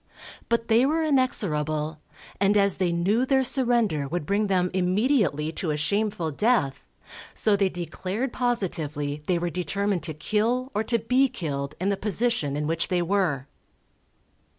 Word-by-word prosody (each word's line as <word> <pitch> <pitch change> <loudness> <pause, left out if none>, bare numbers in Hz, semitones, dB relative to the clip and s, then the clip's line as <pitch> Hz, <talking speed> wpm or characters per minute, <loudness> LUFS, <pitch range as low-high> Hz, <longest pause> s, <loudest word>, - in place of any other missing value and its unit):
But 230 -1 +1
they 230 +2 +4
were 315 +4 +2
inexorable, 155 - 0 0.4
and 200 +1 +3
as 200 -2 +3
they 180 -2 +1
knew 190 +8 +1
their 265 0 +2
surrender 235 - +1
would 165 +1 -3
bring 205 +5 +1
them 180 -2 +1
immediately 185 - +1
to 165 0 -3
a 150 - 0
shameful 200 0 -1
death, 180 - +1 0.5
so 215 -2 +2
they 195 -1 +2
declared 185 - -4
positively 155 - -2
they 180 - +2
were 170 0 -2
determined 195 +1 -1
to 155 -1 -5
kill 230 - 0
or 215 - 0
to 235 - +1
be 250 +4 +2
killed 140 - -4
in 190 +3 0
the 200 - 0
position 210 - 0
in 150 - -2
which 165 +2 0
they 180 -2 +1
were. 170 -8 0
195 Hz, 155 wpm, -25 LUFS, 160-230 Hz, 0.5 s, they